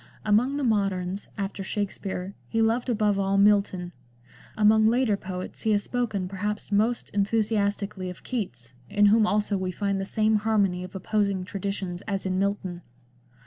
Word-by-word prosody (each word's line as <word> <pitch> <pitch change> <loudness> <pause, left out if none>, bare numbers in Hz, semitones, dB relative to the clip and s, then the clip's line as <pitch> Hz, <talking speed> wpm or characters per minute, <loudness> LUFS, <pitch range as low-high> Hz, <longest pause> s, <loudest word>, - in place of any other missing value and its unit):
Among 235 +7 +3
the 290 - -1
moderns, 195 -4 0
after 195 -1 -3
Shak 205 +1 -2
spere, 190 -1 -5 0.2
he 225 - 0
loved 230 +3 +2
above 210 -3 +2
all 195 0 +1
Milton; 200 -3 +3 0.7
among 215 +1 +5
later 235 -2 +3
poets 185 -2 -7
he 220 - +2
has 205 0 +1
spoken 220 -7 -2
perhaps 205 +3 -4
most 220 +4 +1
enthusiastically 200 -2 0
of 180 - -10
Keats, 130 - -5 0.2
in 205 0 +4
whom 220 -1 +4
also 210 -1 +1
we 185 -1 -2
find 200 +1 -1
the - - -3
same 215 +1 +2
harmony 205 -4 +1
of 185 +1 -10
opposing 200 -1 0
traditions 190 -2 -4
as 195 -2 -2
in 185 0 0
Milton. 195 -3 -2
200 Hz, 160 wpm, -26 LUFS, 190-215 Hz, 0.7 s, among